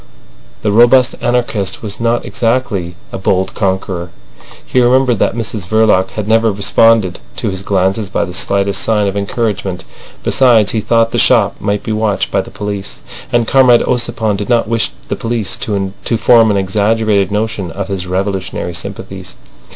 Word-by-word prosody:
The 105 - +1
robust 120 +4 +5
anarchist 115 -6 -1
was 105 -2 -6
not 115 +1 0
exactly 115 -8 -1 0.2
a - - -5
bold 95 0 0
conqueror. 95 -3 -2 0.6
He 130 - +1
remembered 125 -2 +3
that - - +1
Mrs 110 -4 -4
Verloc 105 -3 +3
had 105 -1 -3
never 115 0 +3
responded 100 -1 +2 0.2
to - - -2
his 95 0 -4
glances 95 +1 0
by - - -1
the 90 - -8
slightest 100 +2 0
sign 105 -2 +1
of 100 0 -2
encouragement. 100 -3 -2 0.4
Besides, 120 -6 +4
he 110 - -1
thought 115 +1 +2
the 120 - 0
shop 110 -5 +3
might 100 -1 -2
be - - -4
watched 110 -2 -1
by 100 - +1
the - - -11
police, 100 -1 -6 0.3
and 120 -2 +1
Comrade 130 -3 +5
Ossipon 120 -4 -1
did 105 +3 -5
not 120 -3 +2
wish 115 0 0 0.2
the - - -2
police 115 -3 -2
to 100 -2 -2 0.2
form 115 -1 +5
an 100 - +1
exaggerated 100 +1 +1
notion 105 -3 -2
of 95 +3 -5
his 95 -2 -4
revolutionary 95 -1 -3
sympathies. 85 - -7
105 Hz, 165 wpm, -14 LUFS, 95-115 Hz, 0.6 s, robust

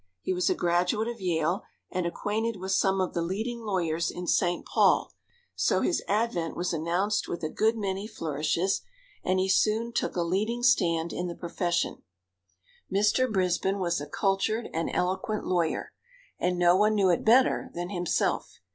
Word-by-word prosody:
He 185 - -2
was 180 -1 +1
a - - +2
graduate 180 +6 +1
of 235 -3 -5
Yale, 170 0 0 0.3
and 180 -2 -1
acquainted 220 +5 -2
with 190 +1 -4
some 195 0 +2
of 185 - -1
the 170 - -1
leading 220 +8 -3
lawyers 170 -6 -1
in 180 - -6
St. 175 0 +1
Paul, - - +3 0.4
so - - +1
his 350 - +1
advent 205 -5 0
was 180 0 -2
announced 175 +6 0
with 170 - -5
a 155 - -1
good 220 +5 +1
many 195 -1 -3
flourishes, 165 +2 -1 0.4
and 185 +1 +1
he 185 0 +1
soon 220 +4 +2
took - - -1
a 175 - +1
leading 215 +8 -1
stand 170 -9 +2
in 180 - -2
the 170 - -5
profession. 170 0 -2 0.9
Mr. 210 +6 +2
Brisbin 190 0 +1
was 170 -4 -1
a 145 - -6
cultured 200 +7 0
and 165 0 -1
eloquent 190 +4 -1
lawyer, 170 -3 -1 0.5
and 180 0 0
no 175 0 +5
one 210 +2 +3
knew 195 -3 +4
it 170 - 0
better 250 +4 +4
than 175 +2 -4
himself. 175 -3 -1
185 Hz, 170 wpm, -28 LUFS, 175-210 Hz, 0.9 s, no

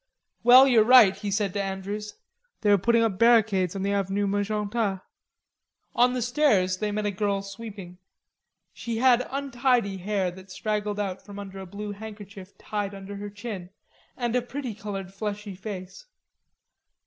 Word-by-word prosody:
"Well, 255 +3 +8
you're 235 -5 +5
right," 230 -4 +7
he 205 - -5
said 200 -1 0
to 200 - -1
Andrews. 200 +2 -5 0.5
"They 210 - +3
are 205 - +6
putting 230 +4 +3
up 210 -4 -1
barricades 220 -6 +4
on 195 - -3
the 200 - 0
Avenue 200 +1 0
Magenta." 205 0 -1 0.9
On 250 +1 +4
the 250 -2 -1
stairs 220 -9 +2
they 210 -1 -1
met 210 0 -2
a 205 - +1
girl 200 0 -1
sweeping. 195 -3 -9 0.7
She 230 -1 -4
had 250 0 +4
untidy 250 -6 0
hair 190 -1 -1
that 190 +2 -14
straggled 210 +1 -2
out 195 -2 -3
from 205 -1 -11
under 195 -1 -8
a 190 - -8
blue 205 +3 -6
handkerchief 205 -2 -10
tied 205 -1 -4
under 195 +1 -8
her 205 +1 -6
chin, 205 -3 -7 0.5
and 240 -1 -1
a 250 - +3
pretty 250 0 -5
colored 195 -2 -6
fleshy 210 0 -5
face. 190 - -8
205 Hz, 160 wpm, -26 LUFS, 195-230 Hz, 0.9 s, Well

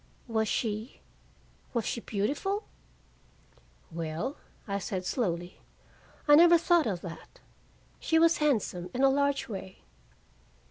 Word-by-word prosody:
"Was 220 -2 0
she 220 +2 -2 0.8
was 235 - 0
she 235 - -2
beautiful?" 290 - -2 1.3
"Well," 165 - -3 0.3
I 200 -1 -1
said 185 -1 -4
slowly, 175 -6 -2 0.7
"I 295 - +7
never 340 +3 +8
thought 340 -3 +3
of 185 -5 -2
that. 175 - -10 0.6
She 320 - +1
was 335 +1 +5
handsome, 215 - 0
in 260 - +1
a 270 - +6
large 280 0 +1
way." 190 -4 -8
230 Hz, 120 wpm, -29 LUFS, 190-295 Hz, 1.3 s, never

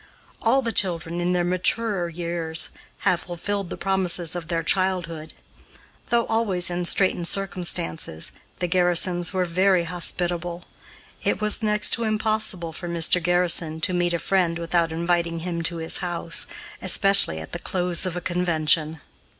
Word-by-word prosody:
All 265 +4 +3
the 230 - -1
children, 170 -4 -1
in 180 +1 0
their 175 -1 +1
maturer 185 +1 0
years, 170 -1 -4 0.3
have 180 - +2
fulfilled 190 +2 -4
the - - -5
promises 180 -3 +1
of 170 -2 -5
their 165 -1 -1
childhood. 170 -4 0 0.7
Though 235 -1 +2
always 195 -6 0
in 175 0 -2
straitened 180 -1 +1
circumstances, 175 - 0 0.3
the 180 - -2
Garrisons 175 0 +2
were 185 -2 0
very 185 +1 +2
hospitable. 175 0 -2 0.6
It - - 0
was 215 +1 0
next 210 -1 +1
to 235 - 0
impossible 215 -6 0
for 175 +2 -7
Mr. 170 +1 +2
Garrison 170 -2 +1
to 185 - +1
meet 175 -1 +1
a - - +1
friend 175 -2 0
without 170 0 0
inviting 170 0 -1
him 170 -1 -3
to 170 - +2
his 160 0 0
house, 170 -2 +2 0.3
especially 195 - +4
at 80 - -9
the - - -5
close 180 -2 +1
of 180 -1 -4
a - - -4
convention. 160 -3 0
175 Hz, 150 wpm, -23 LUFS, 170-185 Hz, 0.7 s, especially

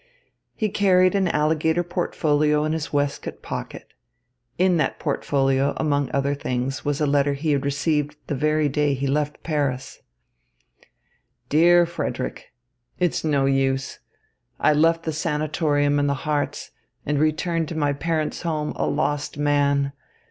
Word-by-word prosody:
He 215 -2 -1
carried 185 -2 +3
an 195 -2 +2
alligator 160 +2 +1
portfolio 150 -4 +1
in 155 +1 0
his 160 -2 -3
waistcoat 145 -1 -2
pocket. - - -7 0.6
In 185 -1 +3
that 150 - 0
portfolio, 135 0 0
among 145 -3 0
other 140 +1 0
things, 130 -1 -3
was 145 -1 -1
a 150 - +2
letter 140 0 +2
he 150 +2 -1
had 140 -2 +1
received 145 +1 0
the - - -3
very 150 +2 +1
day 145 0 +1
he 135 +1 -3
left 150 +1 -1
Paris: 140 -5 -2 1.5
Dear 175 +3 +5
Frederick, 170 - -5 0.5
It's 175 -2 0
no 145 -3 +2
use. 135 0 0 0.6
I - - +4
left 165 +2 +3
the 160 - -2
sanatorium 150 -2 0
in 145 - +1
the 140 - +1
Harz 150 -1 -2 0.3
and 145 0 0
returned 155 +2 0
to 160 - -5
my 145 -2 +1
parents' 155 +1 -2
home 155 -3 -2
a - - 0
lost 145 -1 -1
man. 140 -1 +2
150 Hz, 140 wpm, -23 LUFS, 140-160 Hz, 1.5 s, Dear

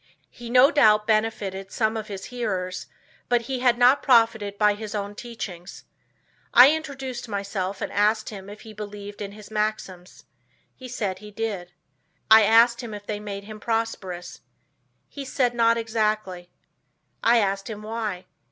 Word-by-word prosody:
He 240 -1 -10
no 255 +3 +6
doubt 215 -7 +4
benefited 210 -3 -1
some 220 -1 0
of 215 -1 -4
his 195 -3 -7
hearers, 185 -7 -3 0.4
but 240 -1 +3
he 255 +2 -4
had 245 -1 +3
not 250 +3 +5
profited 225 -5 +3
by 210 0 +4
his 215 +1 -7
own 205 0 -3
teachings. 200 -6 -8 0.7
I 250 +4 +10
introduced 270 -6 -5
myself 200 -1 -3
and - - -3
asked 215 +2 +1
him 195 -2 -9
if 210 +1 -11
he 220 -1 -11
believed 205 -1 -8
in 200 -1 -5
his 210 0 -13
maxims. 210 -4 -4 0.5
He 255 - -11
said 205 -6 -3
he 210 +1 -11
did. 205 -5 -4 0.6
I 220 0 +10
asked 230 +3 +5
him 225 -3 -7
if 205 0 -10
they 210 - -3
had - - -10
made 200 -1 -5
him 215 +1 -10
prosperous. 210 -6 -3 0.7
He 280 - -8
said 260 -2 0
not 230 -1 +3
exactly. 215 -5 -2 0.7
I 235 +1 +5
asked 195 -2 0
him 215 -1 -7
why. 215 -4 -4
215 Hz, 160 wpm, -24 LUFS, 200-230 Hz, 0.7 s, I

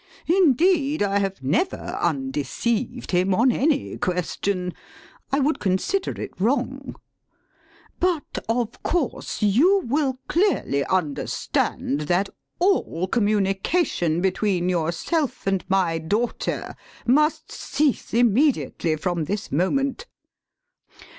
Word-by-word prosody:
Indeed 320 - +3
I 200 0 +1
have 195 -7 -3
never 175 - +1 0.2
undeceived 255 -3 -1
him 185 +1 +2
on 245 +5 +4
any 285 +3 0
question. 180 +1 -1 0.6
I 275 - +2
would 290 +3 +1
consider 195 - -1
it - - -5
wrong. 265 +4 -1 1.0
But 350 -5 -1
of 230 -1 -1
course, 315 -8 -2
you 325 - +4
will 270 0 0
clearly 340 - +1
understand 150 -3 -1
that 185 +3 +2 0.3
all 345 - +1
communication 195 - +1
between 190 -1 +1
yourself 180 - -1
and 195 -1 0
my 180 -4 +2
daughter 210 +9 -2 0.3
must 300 +5 +2
cease 280 -1 -1
immediately 240 - +2
from 170 0 -2
this 200 +5 -4
moment. 270 - 0
225 Hz, 100 wpm, -23 LUFS, 185-285 Hz, 1.0 s, on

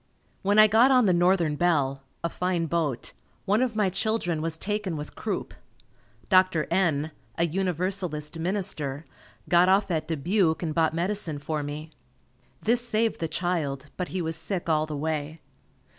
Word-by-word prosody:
When 200 +2 +2
I 215 - +10
got 220 +5 +5
on 255 -3 +5
the 185 - +4
Northern 175 -3 +3
Belle, 145 -5 +1 0.2
a 170 - 0
fine 180 -1 -1
boat, 155 -6 -2 0.3
one 205 +4 +2
of 250 -3 0
my 205 -3 +2
children 190 -5 -1
was 160 0 -2
taken 205 -3 -2
with 150 0 -7
croup. - - -4 0.7
Dr. 185 -4 +4
N, 160 -5 +1 0.3
a 170 - +3
Universalist 175 -3 -2
minister, 165 -6 -2 0.4
got 175 +1 +5
off 195 0 +3
at 160 -2 -1
Dubuque 165 +2 +1
and 160 -2 -2
bought 160 0 +1
medicine 175 -3 -1
for 150 +1 -3
me. 150 +2 -6 0.7
This 235 +2 +3
saved 225 -1 0
the 165 - -1
child, 155 -5 -2
but 180 - -3
he 185 -1 -3
was 160 0 -1
sick 170 +3 -2
all 155 -1 +2
the 150 -1 -4
way. 155 +1 -3
170 Hz, 160 wpm, -26 LUFS, 155-195 Hz, 0.7 s, I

